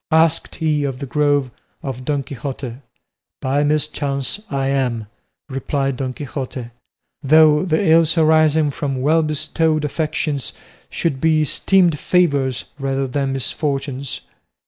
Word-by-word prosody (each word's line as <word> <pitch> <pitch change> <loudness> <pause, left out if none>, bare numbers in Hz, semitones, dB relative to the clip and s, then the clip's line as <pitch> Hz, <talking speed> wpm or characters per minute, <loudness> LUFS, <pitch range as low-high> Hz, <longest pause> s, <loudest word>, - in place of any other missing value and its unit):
asked 160 0 +3
he 155 -3 0
of 135 -2 -2
the 140 - -5
Grove 145 -1 +1 0.3
of 130 -2 -5
Don 145 -1 0
Quixote. 130 -2 -6 0.6
"By 140 +2 +1
mischance 145 +2 -1
I 135 -1 -1
am," 125 -5 0 0.4
replied 135 0 -2
Don 130 -1 -2
Quixote; 130 -3 -6 0.5
"though 150 +1 +5
the 175 +1 +1
ills 165 +1 +4
arising 155 -1 +4
from 140 -2 -3
well 160 +3 +4
bestowed 155 0 0
affections 150 -3 -2 0.4
should 140 -6 -2
be 155 -1 +3
esteemed 175 +1 +3
favours 140 -8 +1 0.2
rather 135 0 -1
than 135 +1 -1
misfortunes." 135 0 -2
145 Hz, 125 wpm, -20 LUFS, 135-155 Hz, 0.6 s, though